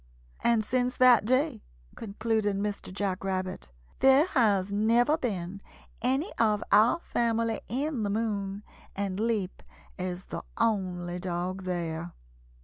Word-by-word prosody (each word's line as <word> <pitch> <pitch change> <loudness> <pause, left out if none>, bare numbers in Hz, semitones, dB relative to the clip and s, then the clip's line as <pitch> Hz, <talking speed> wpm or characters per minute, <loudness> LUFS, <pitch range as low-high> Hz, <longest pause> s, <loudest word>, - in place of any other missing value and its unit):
"] - - -27
"And 230 -2 +3
since 250 +2 0
that 250 -4 +6
day," 255 +5 +1 0.3
concluded 220 -1 -1
Mr. 200 -1 -3
Jack 195 -1 -2
Rabbit, 185 - -3 0.3
"there 270 +3 +6
has 205 - +2
never 235 +7 +3
been 200 - -4 0.4
any 265 - 0
of 215 -2 +2
our 220 +9 +5
family 230 -4 0
in 275 +1 -2
the 205 - -1
moon, 205 -2 -2 0.3
and 195 -1 -2
Leap 215 -4 -1 0.4
is 180 0 -4
the - - -6 0.2
only 180 -5 -1
dog 185 +1 -3
there. 170 -1 -3
205 Hz, 130 wpm, -28 LUFS, 185-235 Hz, 0.4 s, that